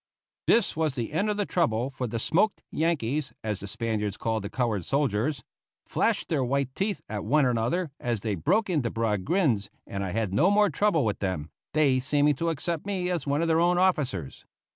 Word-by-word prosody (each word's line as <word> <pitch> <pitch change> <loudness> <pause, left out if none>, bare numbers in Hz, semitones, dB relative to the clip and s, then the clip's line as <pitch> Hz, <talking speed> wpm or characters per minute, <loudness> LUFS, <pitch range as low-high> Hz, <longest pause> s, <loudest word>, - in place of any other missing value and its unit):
This 230 -3 +3
was 155 -2 0
the 120 +1 -3
end 200 +7 +1
of 210 - -1
the 205 - 0
trouble, 130 -9 0
for 130 -2 -3
the 115 +1 -3
"smoked 195 - +1
Yankees" 150 -3 0
as 105 -3 -2
the 100 - -7
Spaniards 105 -1 -2
called 110 -2 -1
the 100 - -4
colored 115 -6 -1
soldiers 140 - 0 0.4
flashed - - 0
their 145 -5 +1
white 135 +1 0
teeth 200 +5 -1
at 105 -2 -4
one 140 +6 +3
another, 125 +8 0
as 120 -4 -2
they 110 -1 -1
broke 190 - +1
into 150 -10 0
broad 110 -4 -1
grins, 140 - +1 0.2
and 100 0 -4
I 95 - -3
had 110 -4 -1
no 160 - +4
more 205 -2 +4
trouble 165 - +2
with 105 - -1
them, 95 -6 -3 0.2
they 140 -4 +4
seeming 145 +3 +2
to 165 +3 0
accept 165 +2 -2
me 185 -3 -1
as 170 -6 -2
one 145 +3 +1
of - - +1
their 165 0 +3
own 175 +1 +3
officers. 145 - 0
140 Hz, 205 wpm, -27 LUFS, 110-170 Hz, 0.4 s, no